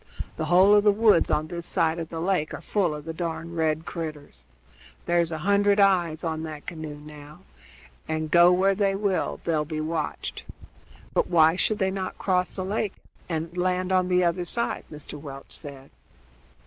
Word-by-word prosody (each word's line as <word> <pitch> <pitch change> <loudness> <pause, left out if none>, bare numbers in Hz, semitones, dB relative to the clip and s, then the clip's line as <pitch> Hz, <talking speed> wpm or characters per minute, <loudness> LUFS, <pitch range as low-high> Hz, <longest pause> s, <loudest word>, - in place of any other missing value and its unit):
The - - -3
whole 185 +3 +6
of 205 0 +5
the 210 - +6
woods 210 -4 +4
on 155 - +1
this 170 0 -5
side 165 +1 +1
of 165 -1 -5
the 165 - -5
lake 175 -3 0
are - - -9
full 180 -7 0
of 150 0 -9
the 165 - -5
darned 165 0 -4
red 160 -1 0
critters. 155 -4 -7 0.6
There's 170 -1 +1
a 160 - -3
hundred 200 0 +3
eyes 175 -5 +3
on 160 -1 -2
that 155 -2 -7
canoe 155 -3 -6
now, 150 +2 -12 0.7
and, 155 -1 -3
go 175 +1 +7
where 190 +2 +3
they 195 0 +1
will, 195 -2 -1
they'll 160 -3 +1
be 155 +1 -5
watched." 155 0 -3 0.7
"But - - +2
why 160 -1 +5
should 210 +3 +1
they 190 -2 0
not 190 -1 -4
cross 180 -2 0
the 185 - -3
lake 205 0 -2 0.3
and 165 +1 -3
land 180 +1 0
on 185 -1 +3
the 180 0 +3
other 175 +1 +1
side?" 235 +7 -3
Mr. 150 -1 -8
Welch 135 -2 -10
said. 140 -2 -10
170 Hz, 185 wpm, -25 LUFS, 155-190 Hz, 0.7 s, go